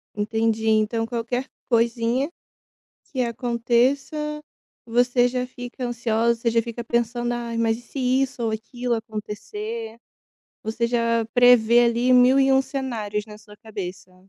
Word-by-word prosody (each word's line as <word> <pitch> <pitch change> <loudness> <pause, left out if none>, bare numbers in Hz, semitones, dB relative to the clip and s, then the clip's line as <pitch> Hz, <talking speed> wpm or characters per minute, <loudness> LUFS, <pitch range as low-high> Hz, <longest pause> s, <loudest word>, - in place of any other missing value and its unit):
Entendi, 220 +1 0
então 220 +1 +2
qualquer 240 +2 -3 0.2
coisinha 235 +3 +1 0.8
que 260 - -2
aconteça 250 +6 0 0.4
você 245 +1 +3
já 250 0 -2
fica 245 0 -7
ansiosa, 235 -1 0
você 235 - +1
já 230 0 +2
fica 235 +1 -6
pensando: 240 +1 -1
"Ai, 235 -1 -3
mas 225 -1 +2
e - - -12
se 245 - -9
isso 260 0 0
ou 225 - 0
aquilo 240 +3 -3
acontecer?" 220 0 -6 0.7
Você 225 +2 -1
já 230 -1 +1
prevê 240 -1 +6
ali 235 +2 +2
mil 250 +2 +6
e 270 - +4
um 265 - +5
cenários 225 -7 -3
na 210 -1 -11
sua 210 -1 -16
cabeça. 190 -4 -8
235 Hz, 140 wpm, -23 LUFS, 225-245 Hz, 0.8 s, prevê